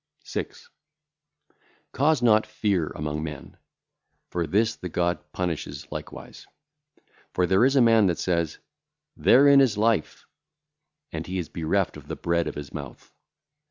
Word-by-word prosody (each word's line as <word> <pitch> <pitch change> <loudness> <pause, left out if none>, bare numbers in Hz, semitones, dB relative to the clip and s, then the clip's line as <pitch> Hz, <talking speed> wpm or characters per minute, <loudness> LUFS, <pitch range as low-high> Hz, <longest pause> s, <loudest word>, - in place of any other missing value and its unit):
6. - - -6 1.2
Cause 145 -1 +2
not 110 -2 +4
fear 95 -7 0
among 75 0 -3
men; 75 -4 -7 0.8
for 85 -2 -1
[this] 110 +7 +1
the 90 - -7
God 85 +1 0
punisheth 90 -4 -4
likewise. - - -9 0.9
For 90 - +2
there 95 +5 +3
is 135 +2 +3
a 135 - +5
man 115 -3 +5
that 85 - 0
saith, 85 -4 -1 0.6
'Therein 140 +1 +6
is 120 -6 +2
life'; 110 -5 0 0.9
and 80 0 -5
he 95 +1 -3
is 85 -4 -4
bereft 85 +4 -1
of - - -14
the - - -4
bread 85 -1 0
of 75 - -5
his 75 -1 -8
mouth. 70 -4 -9
90 Hz, 140 wpm, -25 LUFS, 80-115 Hz, 1.2 s, Therein